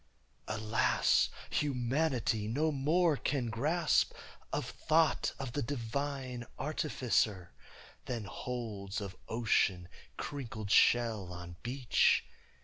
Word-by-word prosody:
Alas, 110 +1 +2 0.2
humanity 125 -5 0
no 150 +8 +1
more 155 +4 +3
can 130 -4 -1
grasp 155 +8 +2 0.4
Of - - -1
thought 160 0 +2
of 135 -3 -5
the 145 - -1
divine 130 0 -3
Artificer, 115 - 0 0.5
Than 120 -3 -3
holds 105 -3 -5
of 100 -3 -6
ocean 100 -6 +2 0.3
crinkled 110 -7 -5
shell 110 -7 +4
on 85 -1 -8
beach! 125 0 +2
120 Hz, 95 wpm, -33 LUFS, 110-145 Hz, 0.5 s, shell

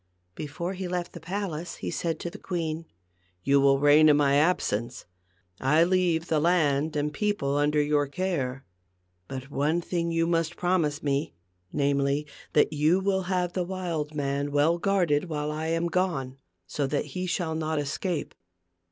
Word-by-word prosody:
Before 160 - -4
he 190 -1 -4
left 175 -1 -3
the 170 - -8
palace 175 -1 -4
he - - -5
said 165 -1 -2
to 175 - -4
the - - -10
queen, 165 -3 -3 0.6
"You 140 0 +4
will 135 0 +4
reign 145 +2 +6
in 145 - +5
my 140 -1 +3
absence. 125 -8 0 0.5
I 150 +5 +4
leave 175 -2 +2
the 155 - +2
land 155 -3 +2
and 150 0 -1
people 205 -8 0
under 145 +1 +2
your 145 -1 +2
care. 140 -6 -2 0.6
But 135 +1 -7
one 150 +5 +1
thing 170 -1 -2
you 165 0 +1
must 165 0 0
promise 170 -5 0
me, 140 - -1 0.4
namely, 140 0 +1 0.3
that 150 - +3
you 155 +5 +3
will 190 0 +1
have 180 -2 0
the 185 - 0
wild 170 -5 -3
man 140 0 -1
well 150 +4 +3
guarded 180 -6 +2
while 150 -1 -2
I 155 +1 -3
am 165 +1 0
gone, 155 -8 -1 0.3
so 140 +7 -2
that 140 +1 -1
he 185 0 -3
shall 170 -2 -1
not 160 0 -2
escape." 150 +3 -2
155 Hz, 165 wpm, -27 LUFS, 145-175 Hz, 0.6 s, reign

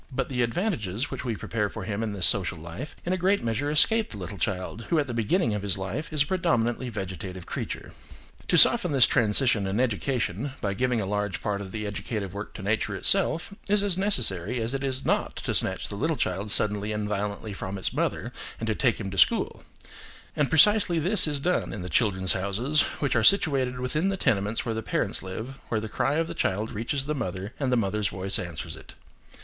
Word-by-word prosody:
But 135 0 -2
the 125 -2 -1
advantages 120 - -1
which - - -5
we 120 -3 -2
prepare 105 -1 -2
for 110 - -7
him 100 +2 -3
in 110 -2 -2
this 95 -4 +1
social 95 -3 +2
life, 85 - -8
in 180 - 0
a - - 0
great 190 +3 +1
measure 120 +5 -1
escape 220 +9 +4
the 105 - -8
little 95 +1 -7
child, 95 +6 -3
who 170 - +2
at 150 - +2
the 125 - -5
beginning 115 - +1
of 105 - -2
his 100 -2 -1
life 100 - -4
is 150 -2 +3
a - - -9
predominantly 125 -9 0
vegetative 95 -3 -6
creature. - - -5 0.6
To 175 - +3
soften 180 -2 +7
this 130 -4 +7
transition 110 -2 +3
in 100 +4 -1
education, 125 0 -1
by 100 -1 -2
giving 125 +3 0
a - - -2
large 105 -1 -2
part 100 -1 -2
of 95 -2 -8
the 105 0 -4
educative 105 -1 -4
work 100 +1 -7
to - - -7
nature 105 0 -1
itself, 175 - +1 0.2
is 205 0 +3
as 200 -3 +2
necessary 125 - +1
as 115 +3 -2
it 135 0 -3
is 130 -1 -1
not - - 0
to - - -3
snatch - - +3
the - - -4
little 160 +9 0
child 100 -4 -2
suddenly 105 +1 +3
and 105 -1 -2
violently 105 +1 -3
from 95 0 -5
its 95 - -3
mother - - -2 0.3
and 115 - -3
to 110 - 0
take 120 +1 +1
him 100 -3 -5
to 95 - -1
school; - - +2 0.7
and 145 -2 +1
precisely 180 +2 +5
this 180 +3 +3
is 145 -2 -1
done 180 +6 0
in 100 - -6
the 90 - -6
"Children's 95 -5 +2
Houses," 105 +11 +1 0.2
which 140 -3 +1
are 115 - +2
situated 135 - +4
within 150 +9 0
the 195 - -1
tenements 110 - 0
where 115 - -1
the 110 - -3
parents - - -1
live, 110 +8 -7
where 110 - 0
the 110 - -5
cry 135 +6 0
of 165 +1 +1
the - - -6
child 105 +4 -1
reaches 120 +5 -2
the 150 - -1
mother 100 -5 -4
and 135 -3 0
the 125 - +3
mother's 105 -1 0
voice 95 -1 -1
answers 85 -2 -6
it. - - -14
115 Hz, 220 wpm, -26 LUFS, 100-140 Hz, 0.7 s, soften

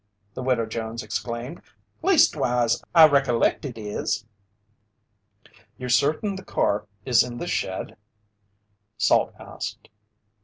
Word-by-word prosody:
the - - -6
Widow 125 -3 +1
Jones 115 +1 -5
exclaimed. 120 +7 -5 0.4
"Leastwise, 125 - +3
I 165 -1 +10
recollect 135 -3 +2
it 125 -4 -6
is!" 105 0 -3 1.5
"You're 125 0 -6
certain 155 - +2
the 190 - -9
car 105 +1 0
still 125 - -8
is 120 - +7
in 120 -1 -3
the 175 - -4
shed?" 95 - -3 1.0
Salt - - +3
asked. - - -7
125 Hz, 115 wpm, -24 LUFS, 115-140 Hz, 1.5 s, I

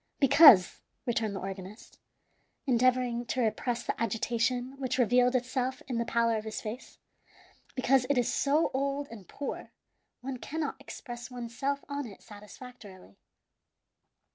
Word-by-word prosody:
"Because," 275 - +7 0.2
returned 225 -4 -1
the - - -3
organist, 195 +2 -8 0.7
endeavoring 250 -1 +2
to 260 - -1
repress 235 +2 -1
the - - -4
agitation 240 +3 -1
which 260 -1 -2
revealed 245 +1 +3
itself 255 +1 -1
in 245 -3 -2
the 235 - 0
pallor 230 -1 +1
of 215 - -4
his 220 0 -5
face 225 +4 -8 0.8
"because 255 0 +2
it 285 - +2
is 245 - +1
so 295 +3 +2
old 280 +1 -1
and 210 -5 -11
poor; 285 - -6 0.5
one 260 +1 -5
cannot 310 +5 -4
express 240 -2 -8
one's 240 -2 -7
self 280 +2 -2
on 285 -2 -4
it 200 - -13
satisfactorily." 205 - -13
245 Hz, 140 wpm, -29 LUFS, 225-265 Hz, 0.8 s, Because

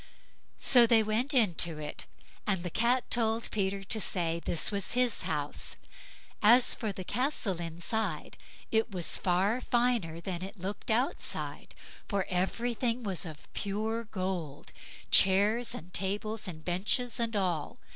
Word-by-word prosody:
So 245 -3 +6
they 225 -1 +5
went 220 +6 0
into 175 - +3
it, 150 -1 -6 0.4
and 190 -4 +1
the 175 - -4
Cat 240 +5 +1
told 230 -1 0
Peter 195 -1 -1
to 215 +2 -1
say 170 -3 0
this 170 - +2
was 200 -2 -2
his 245 -2 +2
house. 150 -2 -3 0.7
As 240 +4 +6
for 220 -3 -3
the 190 -1 -7
castle 220 - -1
inside, 170 +1 -3 0.4
it 220 +1 +2
was 180 -5 +2
far 195 +7 +1
finer 235 -11 0
than 175 0 -5
it 195 +2 -8
looked 195 +3 -6
outside, 240 +5 -2 0.3
for 200 -3 -1
everything 235 +6 -1
was 190 -3 -1 0.3
pure 220 +3 -2
gold—chairs, 190 - +1
and 180 -4 -10
tables, 210 +3 -2
and 160 -3 -8
benches, 215 +8 0
and 230 -1 -1
all. 180 -7 -1
205 Hz, 135 wpm, -30 LUFS, 180-230 Hz, 0.7 s, So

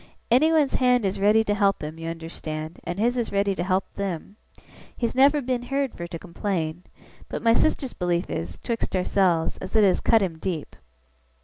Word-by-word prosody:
Anyone's 305 +2 +4
hand 250 -3 +3
is 190 0 -1
ready 210 +3 +4
to 205 - 0
help 200 -3 +1
him, 155 +2 -6
you 165 0 -4
understand, 160 -1 -6
and 175 - -4
his 240 +4 +1
is 235 - -1
ready 200 0 +1
to 175 - -3
help 185 +1 +1
them. 195 0 -4 0.6
He's 235 -2 -1
never 280 +2 +4
been 250 -1 -1
heerd 275 +1 -2
fur 170 - -6
to 170 -1 -6
complain. 170 -1 -3 0.4
But - - -5
my 230 -1 +5
sister's 270 0 +1
belief 175 -1 -1
is 85 +1 -4
['twixt 230 - -3
ourselves) 180 -3 +1
as 190 - -8
it 215 - +6
has 190 -2 +4
cut 225 -3 +4
him 165 -4 -3
deep. 165 -4 -4
195 Hz, 190 wpm, -25 LUFS, 170-235 Hz, 0.6 s, it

